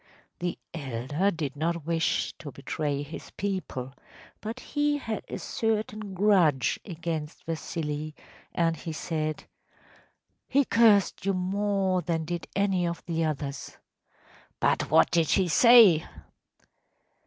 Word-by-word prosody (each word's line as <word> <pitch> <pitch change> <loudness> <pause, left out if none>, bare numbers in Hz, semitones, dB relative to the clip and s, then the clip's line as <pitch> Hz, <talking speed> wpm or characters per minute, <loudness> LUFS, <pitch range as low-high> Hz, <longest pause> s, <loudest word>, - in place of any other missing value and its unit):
‚ÄĚ - - -30
The 175 0 -3
elder 145 +4 -1
did 150 -6 -3
not 165 +1 -2
wish 165 0 0
to 145 - -8
betray 145 +1 -3
his 150 +3 -9
people, 185 -10 -3 0.5
but 225 +4 -5
he 295 +1 0
had 225 -6 -4
a - - -5
certain 215 -2 -2
grudge 180 - +3
against 165 -4 -5
Vasili, 155 -2 -4 0.4
and 165 -1 +1
he 160 +2 -6
said: 155 -1 -3 1.0
“He 280 +1 +3
cursed 220 -7 +4
you 195 0 +1
more 190 0 0
than 165 -2 -2
did 175 +1 -4
any 195 -3 +1
of 170 0 -5
the 165 -1 -1
others.‚ÄĚ 145 -3 -4 0.8
“But - - +1
what - - +5
did 165 -2 +2
he 190 -2 +3
say? 215 -3 +7
170 Hz, 125 wpm, -27 LUFS, 155-200 Hz, 1.0 s, say